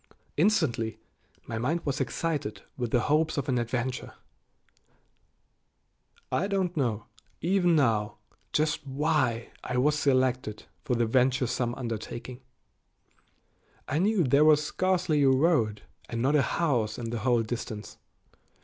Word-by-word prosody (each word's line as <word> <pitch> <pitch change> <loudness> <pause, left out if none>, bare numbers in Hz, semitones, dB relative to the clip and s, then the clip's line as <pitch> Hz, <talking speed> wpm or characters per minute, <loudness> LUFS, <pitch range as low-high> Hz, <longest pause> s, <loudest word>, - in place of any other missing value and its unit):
Instantly 150 - +1 0.5
my 110 -1 -4
mind 155 +8 -1
was 140 0 -1
excited 140 -12 -2
with 120 -3 -3
the 120 - +2
hopes 155 +4 +1
of 140 - -1
an 125 -3 +1
adventure. 125 +2 -3 2.2
I 195 - +1
don't 190 -3 -1
know, 120 -7 -1 0.3
even 175 -1 +2
now, 110 -8 +1 0.3
just 150 0 +1
why 135 -5 0
I 125 - -2
was 145 +4 +3
selected 130 -6 +1 0.2
for 125 - 0
the 120 0 +2
venturesome 125 0 +1
undertaking. 120 +1 -6 1.5
I 145 - 0
knew 200 0 +3
there 140 +2 +4
was 150 -1 +5
scarcely 180 -3 +1
a 135 - +5
road 130 -7 +2 0.3
and 115 - -3
not 135 +5 +2
a 150 - +5
house 120 -10 0
in 115 -1 -4
the 120 - -2
whole 120 0 +2
distance. 110 -2 -6
130 Hz, 130 wpm, -28 LUFS, 115-155 Hz, 2.2 s, was